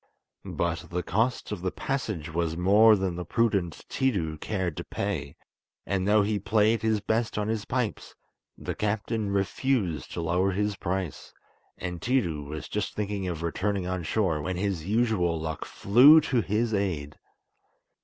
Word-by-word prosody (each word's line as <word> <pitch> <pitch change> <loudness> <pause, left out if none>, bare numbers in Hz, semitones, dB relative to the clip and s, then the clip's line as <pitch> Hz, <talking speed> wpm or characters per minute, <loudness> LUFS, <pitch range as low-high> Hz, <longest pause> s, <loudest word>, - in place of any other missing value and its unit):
But 85 -1 -2
the 90 0 -2
cost 110 +10 0
of 105 -4 -4
the 95 - 0
passage 95 - -3
was 85 -1 -1
more 105 +5 +6
than 95 -3 -2
the 90 - -4
prudent 95 -4 0
Tiidu 85 - -1
cared 95 -5 -2
to - - -4
pay, 75 -9 -4 0.5
and 95 +1 -1
though 105 0 +5
he 105 0 0
played 110 +2 +2
his 110 -1 +1
best 110 +2 -1
on 105 0 -1
his 110 -1 -2
pipes, 125 -4 -3 0.4
the - - -4
captain 105 0 -1
refused 100 - -1
to - - -3
lower 90 +3 +1
his 105 +1 0
price, 95 -3 -4 0.5
and 90 -1 -5
Tiidu 90 - 0
was 75 +1 -6
just 105 - -3
thinking 100 -2 -2
of 85 -2 -4
returning 95 +3 -1
on 90 0 -2
shore 85 -3 0
when 90 +4 -3
his 95 -4 -2
usual 105 -7 +1
luck 80 -1 -4
flew 130 +10 +7
to 130 -6 +1
his 110 +3 0
aid. 85 -7 -2
100 Hz, 160 wpm, -27 LUFS, 85-110 Hz, 0.5 s, flew